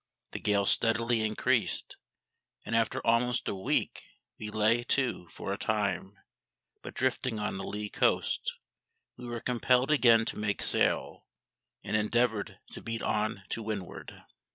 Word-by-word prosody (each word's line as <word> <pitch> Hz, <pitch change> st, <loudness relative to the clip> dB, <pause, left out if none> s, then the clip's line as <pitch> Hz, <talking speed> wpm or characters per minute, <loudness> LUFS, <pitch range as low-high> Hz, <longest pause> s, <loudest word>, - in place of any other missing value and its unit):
The -, -, -5 dB
gale 100 Hz, -1 st, +1 dB
steadily 115 Hz, +2 st, +2 dB
increased, 110 Hz, 0 st, 0 dB, 0.7 s
and 115 Hz, -, -1 dB
after 115 Hz, +3 st, 0 dB
almost 120 Hz, +1 st, +2 dB
a -, -, 0 dB
week 95 Hz, -, -1 dB, 0.4 s
we 105 Hz, -, -5 dB
lay 110 Hz, +2 st, +3 dB
to 125 Hz, -10 st, 0 dB
for 95 Hz, -, -5 dB
a 100 Hz, -, -5 dB
time; 100 Hz, -2 st, -1 dB, 0.7 s
but -, -, -9 dB
drifting 130 Hz, -2 st, 0 dB
on 105 Hz, -2 st, -3 dB
a -, -, -5 dB
lee 105 Hz, 0 st, -3 dB
coast, 485 Hz, -, 0 dB, 0.6 s
we 125 Hz, 0 st, -9 dB
were 120 Hz, 0 st, -4 dB
compelled 125 Hz, +2 st, +2 dB
again 115 Hz, -6 st, +5 dB
to -, -, -4 dB
make 105 Hz, -1 st, 0 dB
sail, -, -, +1 dB, 0.6 s
and 100 Hz, -, -2 dB
endeavoured 110 Hz, 0 st, +1 dB
to -, -, -8 dB
beat 115 Hz, 0 st, -4 dB
on 105 Hz, -2 st, -1 dB
to 115 Hz, -, -3 dB
windward. 105 Hz, -4 st, -6 dB
110 Hz, 145 wpm, -30 LUFS, 105-120 Hz, 0.7 s, again